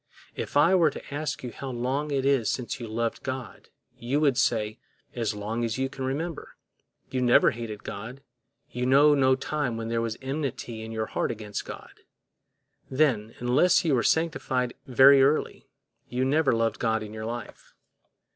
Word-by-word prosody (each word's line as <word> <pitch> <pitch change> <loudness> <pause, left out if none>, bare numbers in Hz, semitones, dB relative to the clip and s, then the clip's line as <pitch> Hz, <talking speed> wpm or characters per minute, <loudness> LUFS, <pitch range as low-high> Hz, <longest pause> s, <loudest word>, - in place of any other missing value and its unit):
If - - -3
I 160 +6 +5
were 170 -4 +5
to 140 - -10
ask 150 -1 -3
you 125 - -5
how 135 - -7
long 130 +4 -2
it 135 -2 -1
is 135 -5 +2
since 125 -2 -4
you 120 - -6
loved 115 +1 -2
God, 130 -2 -6 0.3
you 130 +5 0
would 145 -4 +3
say, 110 -2 0 0.3
As 115 -3 -2
long 110 +3 -3
as 115 0 -2
you 135 0 -1
can 135 -1 -7
remember; 150 +5 -4 0.6
you 130 -1 -1
never 120 -1 +5
hated 110 -2 -7
God, 120 +7 -7 0.5
you 125 +1 -2
know 145 +3 +6
no 130 -2 +4
time 135 -3 -2
when 115 0 -4
there 115 0 0
was 115 -1 -3
enmity 130 -4 -4
in 110 0 -7
your 110 -1 -2
heart - - -2
against 105 -3 -5
God. - - -10 0.9
Then, 130 -6 +1
unless 135 +10 +3
you 155 - +2
were 125 - +3
sanctified 130 -6 0
very 135 +2 +7
early, 140 +3 +1 0.4
you 125 +1 0
never 145 +2 +3
loved 115 0 0
God 110 -1 0
in 105 0 -9
your 110 0 -5
life. 120 -2 -8
125 Hz, 175 wpm, -27 LUFS, 115-140 Hz, 0.9 s, very